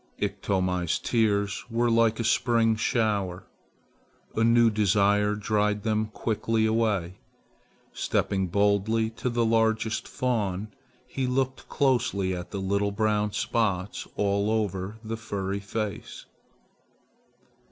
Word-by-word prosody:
Iktomi's 90 -3 0
tears 100 -4 0
were 120 +1 +1
like 115 -1 +3
a - - 0
spring 115 -1 +2
shower. 105 -6 0 0.9
A 110 - +2
new 115 0 +5
desire 105 0 +2
dried 105 0 0
them 110 -1 0
quickly 110 0 -1
away. 105 -5 0 0.7
Stepping 95 -1 0
boldly 105 +4 +1
to 120 +2 -3
the 120 -1 +1
largest 110 0 +1
fawn, 105 -5 -2 0.4
he 130 -1 -3
looked 130 +1 -2
closely 110 -9 +1
at 90 -1 -7
the 100 - -5
little 100 +1 0
brown 105 0 0
spots 100 -4 -1
all 100 0 +1
over 105 -2 -2
the 115 +1 -4
furry 100 -3 -3
face. 100 +1 -5
105 Hz, 110 wpm, -27 LUFS, 100-115 Hz, 0.9 s, new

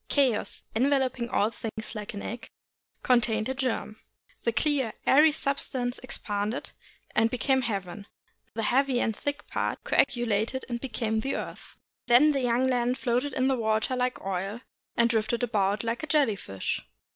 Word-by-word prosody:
Chaos, 260 -7 +1
enveloping 260 -1 +1
all 210 -1 +2
things 220 -1 -6
like 210 -1 -6
an 200 - -5
egg, 235 +2 -6 0.5
contained 230 -3 +2
a - - 0
germ. 255 -5 -2 0.5
The 235 - +3
clear, 270 -2 +1
airy 300 +3 +7
substance 270 -4 -1
expanded 210 -2 -3 0.4
and 225 +1 +4
became 260 +2 +1
heaven, 200 -3 -4 0.5
the 225 - -1
heavy 260 +2 +2
and 225 -3 0
thick 285 +5 -4
part - - -2
coagulated 240 0 +1
and 240 -2 -3
became 220 -3 -1
the 270 +5 -1
earth. - - -7 0.3
Then 260 +6 +7
the 275 -2 0
young 245 +1 +2
land 250 0 +1
floated 255 +2 0
in 260 0 +2
the 265 - +3
water 220 +1 0
like 250 0 0
oil, 195 +4 -3 0.4
and 235 - +5
drifted 230 +1 0
about 210 -3 +1
like 230 +1 -2
a 315 - -4
jelly 285 -8 +3
fish. 95 - -3
240 Hz, 155 wpm, -28 LUFS, 220-260 Hz, 0.5 s, airy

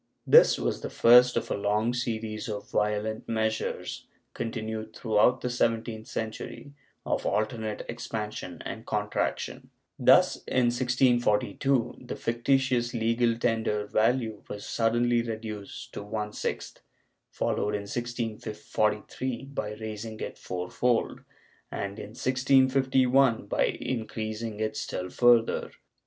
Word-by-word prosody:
This - - +7
was - - -2
the - - -4
first 125 +1 +6
of - - -2
a - - +1
long 105 +3 +1
series 115 -1 -3
of 105 -1 -6
violent 105 +1 -1
measures 110 -1 -2 0.3
continued 110 -1 -4
throughout 115 +3 +3
the 125 - -1
seventeenth 115 -2 -1
century, 110 +5 -6 0.3
of - - -1
alternate 110 0 -1
expansion 105 -5 -5
and 115 0 -6
contraction. 105 -1 -2 0.3
Thus, - - +6
in 125 -2 +2
1642 120 0 +2
the - - -4
fictitious 120 0 +1
legal 115 +1 +2
tender 110 -3 0
value 110 0 +1
was 105 - -6
suddenly 120 +1 +2
reduced 110 -3 -6
to - - -5
one 105 +1 -4
sixth, - - -4 0.5
followed 105 0 -1
in 105 - -2
1643 115 +1 -2
by 105 -6 -3
raising 110 0 -6
it - - -6
fourfold, 90 +7 -1 0.5
and 100 +1 -4
in 105 +2 -9
1651 130 -1 +3
by - - +1
increasing 110 -2 -4
it 110 0 -1
still 90 0 -4
further. 120 -2 +4
115 Hz, 115 wpm, -28 LUFS, 105-120 Hz, 0.5 s, This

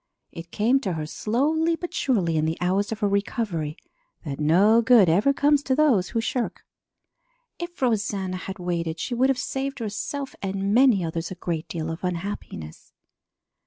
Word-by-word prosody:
It 165 0 -9
came 235 +9 +2
to 195 -9 -2
her 155 -2 -3
slowly 305 - 0
but 350 +1 -7
surely 190 -11 +1
in 155 0 +1
the 160 +1 -1
hours 190 +4 0
of 225 0 -4
her 205 - +3
recovery 200 -6 -2 0.5
that 140 -2 -5
no 195 +10 +5
good 225 -4 +6
ever 200 +12 +4
comes 285 +1 +3
to 265 -2 0
those 260 -12 +3
who 230 - -1
shirk. 245 +2 -3 0.9
If 345 -4 -6
Rosanna 200 -5 0
had 190 +2 -7
waited, 170 -2 -3
she 245 - -3
would 255 +3 +2
have 270 - +2
saved 270 +2 -3
herself 260 +5 -4
and 195 +1 -1
many 235 -7 +5
others 165 0 -3
a 185 - -6
great 170 -2 -4
deal 165 -1 -4
of 165 +3 -7
unhappiness. 175 - -5
200 Hz, 170 wpm, -25 LUFS, 170-255 Hz, 0.9 s, good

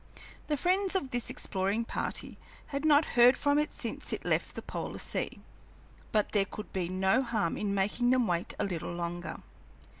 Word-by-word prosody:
The 295 - 0
friends 375 +4 +1
of 275 -9 -1
this 245 -2 -2
exploring 200 +4 -1
party - - -4 0.3
had 280 +1 -2
not 305 0 +6
heard 245 +2 +7
from 285 0 +3
it 300 - 0
since - - -4
it - - -3
left - - +1
the - - -5
polar - - -5
sea, - - -2 0.7
but 210 -1 +2
there 200 -2 +3
could 210 - -8
be 180 -2 -1
no 190 +6 +3
harm 220 -9 0
in 200 -1 -1
making 210 +5 +1
them 255 -1 +4
wait 175 -3 -1
a 210 - 0
little 175 -5 -3
longer. 175 0 -4
225 Hz, 180 wpm, -31 LUFS, 190-275 Hz, 0.7 s, heard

